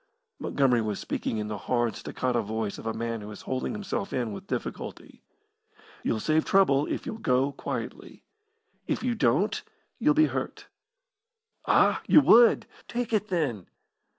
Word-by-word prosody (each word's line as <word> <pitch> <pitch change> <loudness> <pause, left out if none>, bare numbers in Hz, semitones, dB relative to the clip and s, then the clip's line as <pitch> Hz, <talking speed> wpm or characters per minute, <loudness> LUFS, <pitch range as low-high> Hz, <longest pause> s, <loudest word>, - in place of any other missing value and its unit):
Montgomery 130 -4 +2
was 105 -2 -2
speaking 110 - -3
in 105 0 -3
the 105 -1 -4
hard, 120 -2 0
staccato 125 -2 -1
voice 110 -1 -3
of - - -7
a - - +1
man 115 0 -3
who 105 - -8
is 105 - -10
holding 130 - -2
himself 205 -1 -4
in 120 -4 -1
with 100 - -8
difficulty. - - -6 0.8
"You'll 110 - -1
save 155 +7 +2
trouble 150 -8 +3
if - - -3
you'll 220 - -5
go 130 - +2
quietly. 140 - -6 0.6
If - - -1
you 250 -1 +1
don't 160 - +1 0.4
you'll 300 0 +3
be 310 0 +6
hurt. - - -4 1.0
Ah, - - +4
you - - +8
would? 235 -4 +6 0.2
Take 240 -1 -3
it, 215 -1 +1
then!" 145 - -1
130 Hz, 155 wpm, -27 LUFS, -, 1.0 s, you